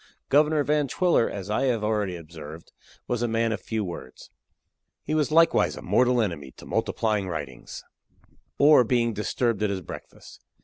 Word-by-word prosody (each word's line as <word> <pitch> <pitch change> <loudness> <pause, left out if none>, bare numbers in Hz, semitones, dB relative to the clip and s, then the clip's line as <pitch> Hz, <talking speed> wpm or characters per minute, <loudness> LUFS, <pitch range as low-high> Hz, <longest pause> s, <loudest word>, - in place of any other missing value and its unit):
Governor 150 +1 +3
Van 150 0 +1
Twiller, 170 -4 +2
as 100 0 -6
I 110 - +1
have 120 -5 0
already 105 -4 0
observed, 80 -1 -10 0.4
was 120 -1 -1
a 120 - +1
man 115 0 0
of 110 - -3
few 110 -2 -3
words; 75 -9 -9 0.7
he - - -3
was 155 -2 +1
likewise 165 +1 +4
a - - -9
mortal 125 0 +3
enemy 85 -10 -3
to - - -12
multiplying 105 -3 -1
writings 75 -8 -7 0.7
or 145 -2 +6
being 120 -1 +1
disturbed 105 +1 -1
at 105 - +1
his 95 -2 -3
breakfast. 85 - -11
110 Hz, 165 wpm, -25 LUFS, 95-130 Hz, 0.7 s, or